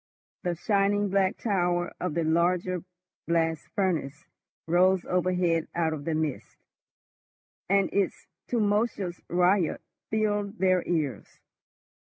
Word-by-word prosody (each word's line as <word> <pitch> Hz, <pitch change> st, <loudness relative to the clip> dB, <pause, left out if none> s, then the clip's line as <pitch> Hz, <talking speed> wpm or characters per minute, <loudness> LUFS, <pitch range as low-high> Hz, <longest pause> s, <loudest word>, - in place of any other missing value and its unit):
The 175 Hz, -1 st, -1 dB
shining 200 Hz, +2 st, +1 dB
black 190 Hz, 0 st, +1 dB
tower 175 Hz, -5 st, 0 dB
of 180 Hz, -4 st, -2 dB
the 170 Hz, -, +1 dB
larger 175 Hz, +2 st, +1 dB, 0.4 s
blast 165 Hz, -1 st, 0 dB
furnace 165 Hz, -6 st, -1 dB, 0.4 s
rose 180 Hz, +2 st, +3 dB
overhead 180 Hz, -2 st, +1 dB
out 165 Hz, -2 st, +1 dB
of 145 Hz, -2 st, -6 dB
the 165 Hz, -, 0 dB
mist, 155 Hz, -3 st, -3 dB, 1.1 s
and 195 Hz, 0 st, +4 dB
its 200 Hz, -2 st, 0 dB, 0.2 s
tumultuous 205 Hz, -5 st, 0 dB
riot 180 Hz, 0 st, +2 dB, 0.3 s
filled 210 Hz, -1 st, 0 dB
their 185 Hz, -1 st, +3 dB
ears. 150 Hz, -, -2 dB
180 Hz, 110 wpm, -27 LUFS, 165-195 Hz, 1.1 s, and